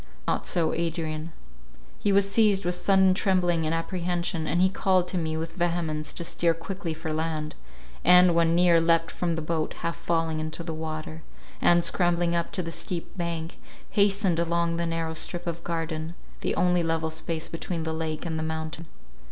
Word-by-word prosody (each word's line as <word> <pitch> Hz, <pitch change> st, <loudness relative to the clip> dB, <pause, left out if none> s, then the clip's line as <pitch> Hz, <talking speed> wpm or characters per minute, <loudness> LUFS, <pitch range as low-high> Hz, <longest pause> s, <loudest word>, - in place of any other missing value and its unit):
Not -, -, -1 dB
so 165 Hz, -3 st, +1 dB
Adrian. 165 Hz, -1 st, -2 dB, 0.7 s
He 205 Hz, -, +1 dB
was 200 Hz, 0 st, +4 dB
seized 200 Hz, -2 st, +3 dB
with 175 Hz, -, +1 dB
sudden 190 Hz, +1 st, +4 dB
trembling 180 Hz, -4 st, +1 dB
and 160 Hz, -, 0 dB
apprehension, 170 Hz, -1 st, -2 dB
and 170 Hz, +4 st, +1 dB
he 185 Hz, -, +6 dB
called 185 Hz, -1 st, +1 dB
to 185 Hz, -, -2 dB
me 160 Hz, -1 st, -2 dB
with 165 Hz, +1 st, -4 dB
vehemence 170 Hz, -3 st, -1 dB
to 170 Hz, -, -4 dB
steer 170 Hz, 0 st, +1 dB
quickly 180 Hz, +1 st, -5 dB
for 160 Hz, 0 st, -4 dB
land, 155 Hz, -1 st, -2 dB, 0.5 s
and, 180 Hz, 0 st, +7 dB
when 165 Hz, 0 st, +3 dB
near, 170 Hz, -1 st, +5 dB
leapt 165 Hz, 0 st, +3 dB
from 170 Hz, -2 st, -1 dB
the 160 Hz, -, -3 dB
boat, 160 Hz, 0 st, -2 dB
half 170 Hz, 0 st, -2 dB
falling 165 Hz, -2 st, -1 dB
into 155 Hz, +2 st, -4 dB
the 165 Hz, -1 st, -4 dB
water; 155 Hz, 0 st, -5 dB, 0.4 s
and, 175 Hz, 0 st, +4 dB
scrambling 175 Hz, -1 st, +1 dB
up 170 Hz, -1 st, -1 dB
the 170 Hz, -3 st, -2 dB
steep 170 Hz, +1 st, -5 dB
bank, 170 Hz, -2 st, -4 dB, 0.3 s
hastened 200 Hz, -4 st, +3 dB
along 170 Hz, 0 st, +1 dB
the 170 Hz, 0 st, -1 dB
narrow 165 Hz, -1 st, -2 dB
strip 175 Hz, +2 st, -3 dB
of 170 Hz, -1 st, -4 dB
garden, 165 Hz, -1 st, -3 dB, 0.2 s
the -, -, -1 dB
only 180 Hz, -1 st, +3 dB
level 165 Hz, -1 st, -1 dB
space 160 Hz, 0 st, -2 dB
between 165 Hz, 0 st, -4 dB
the 160 Hz, 0 st, -2 dB
lake 160 Hz, +1 st, -3 dB
and 160 Hz, -2 st, -2 dB
the -, -, -2 dB
mountain. 160 Hz, +1 st, -4 dB
170 Hz, 180 wpm, -26 LUFS, 160-175 Hz, 0.7 s, and